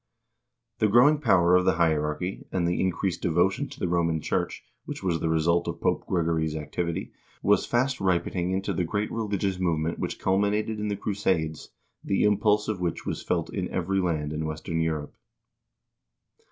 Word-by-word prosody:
* 120 -1 -57
The 110 - +4
growing 125 +8 +5
power 90 -10 +4
of 90 - +4
the - - +3
hierarchy, 80 +2 0
and 85 -2 0
the 85 - 0
increased 95 0 -1
devotion 85 +3 +1
to - - -11
the - - 0
Roman 85 -2 +1
Church, - - -2 0.2
which - - -6
was 85 -3 0
the 80 - -1
result 80 +2 +2
of - - -4
Pope - - 0
Gregory's 80 -3 0
activity, 80 +2 -3 0.3
was 105 +1 +3
fast 125 +2 +1
ripening 90 -1 0
into 95 +1 -1
the 90 - 0
great 100 +5 -2
religious 100 -4 -1
movement 85 -2 0
which - - -3
culminated 105 +3 0
in 105 - -2
the 100 -1 -2
crusades, 95 -7 -1 0.3
the 95 - +1
impulse 105 0 +3
of 105 -4 -2
which 85 -2 -2
was - - -3
felt - - -2
in - - -2
every 95 +2 0
land 80 -5 -1
in 80 +1 -2
western 80 +1 -3
Europe. 80 -2 -2
90 Hz, 175 wpm, -26 LUFS, 80-100 Hz, 0.3 s, growing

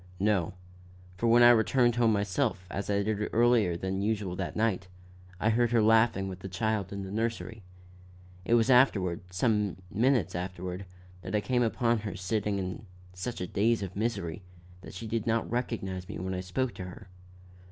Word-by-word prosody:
"No; 95 -4 +1 0.6
for 115 +6 -1
when 120 +1 +6
I 120 - +9
returned 120 +1 +3
home 115 -2 +4
myself, 100 -2 0
as 100 - -4
I 100 0 +1
did 105 0 -1
earlier 115 -7 +3
than 95 +2 -2
usual 100 -3 -1
that - - -4
night, 110 -4 0 0.5
I 110 - +2
heard 120 +1 +2
her 115 -1 +3
laughing 110 -3 +4
with 95 -1 -6
the 95 - -7
child 100 +1 -1
in 100 -1 -5
the 95 - -7
nursery. 110 0 -3 0.8
It 115 - +3
was 120 +3 +3
afterward, 100 -9 +4
some 105 0 +1 0.2
few - - -6
minutes 125 - +3
afterward, 90 +1 -5 0.3
that 95 - -4
I - - +3
came 125 +3 0
upon 115 0 +1
her 105 -1 -5
sitting 100 +1 -1
in 95 +3 -5 0.3
such 95 +6 -5
a - - -1
daze 105 +4 +1
of 95 -1 -6
misery, 100 -5 -2 0.4
that 95 - -11
she 105 - -6
did 110 0 -2
not 115 0 +1
recognize 95 -6 -3
me - - -5
when 95 +1 -3
I 90 - -2
spoke 115 +7 -2
to 95 -1 -7
her. 90 0 -10
105 Hz, 185 wpm, -29 LUFS, 95-115 Hz, 0.8 s, I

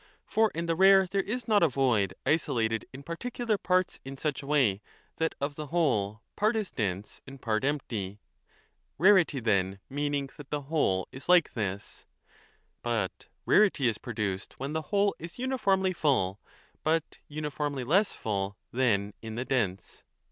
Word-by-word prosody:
For 220 0 +3
5 - - -23
in 170 - -1
the 165 -1 0
rare 190 +2 +7
there 195 +2 0
is 230 +4 -4
not 210 -2 +4
a 170 - +6
void 120 - +1
isolated 115 -8 +1
in 135 +1 -10
particular 230 - -2
parts 185 0 +1
in 135 +1 -8
such 150 0 -2
a 140 - -10
way 125 -10 +3 0.4
that 160 0 0
of 140 +1 -2
the 150 +1 -6
whole 115 - 0
part 215 +3 +2
is 215 -3 -2
dense 100 -2 -3
and 135 0 -10
part 110 -2 -1
empty 110 -9 -2 0.8
4 160 - -8
(rarity 170 -8 +3
then 100 -4 +1
meaning 145 -1 -1
that 145 -2 -11
the 150 -1 -2
whole 135 - +1
is 135 +5 -10
like 180 -3 +5
this); 100 -3 -4 0.7
but 115 -6 -2 0.2
rarity 195 -11 +4
is 110 -3 0
produced 105 -5 -4
when 135 +3 -3
the 160 - 0
whole 200 -1 +3
is 170 +2 -8
uniformly 200 -8 +1
full, 105 - +1 0.4
but 160 0 0
uniformly 145 -2 -3
less 190 - +3
full 100 -2 -3 0.2
than 105 -5 +1
in 110 -1 -6
the 125 +2 -3
dense. 105 -9 -2
140 Hz, 165 wpm, -29 LUFS, 110-170 Hz, 0.8 s, rare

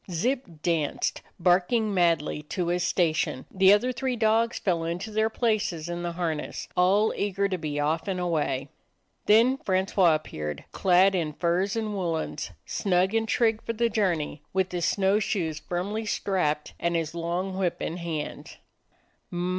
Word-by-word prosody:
Zip 245 +10 0 0.2
danced, 165 -4 0 0.2
barking 190 +5 +2
madly, 165 -5 +1
to 180 -3 -1
his 175 +1 0
station; 160 -7 0
the 190 0 +5
other 210 +5 +4
three 255 0 -2
dogs 225 +1 +2
fell 170 -4 0
into 175 +6 -4
their 220 +1 +1
places 215 -9 -1
in 175 0 -4
the 175 -1 -3
harness, 165 -3 -3
all 195 +4 +3
eager 200 0 0
to 185 -2 -3
be 150 -2 -3
off 155 +5 0
and 190 -2 -1
away. 150 -6 -1 0.6
Then 230 +5 +5
Francois 190 -5 +2
appeared, 75 - -5
clad 190 +1 +4
in 165 -5 -1
furs 180 +5 0
and 220 -2 -2
woolens, 170 -5 -2 0.2
snug 190 0 +1
and 225 0 +1
trig 225 -1 +2
for 230 - -3
the 235 +1 +1
journey, 175 -9 -1
with 190 0 +1
his 175 -1 -1
snow 195 +2 +2
shoes 170 -7 -1
firmly 205 +5 -3
strapped 180 -8 -1
and 170 0 0
his 165 -1 -1
long 175 +3 -2
whip 185 -2 -1
in 165 - -3
hand. 165 -3 -5
180 Hz, 155 wpm, -27 LUFS, 165-210 Hz, 0.6 s, the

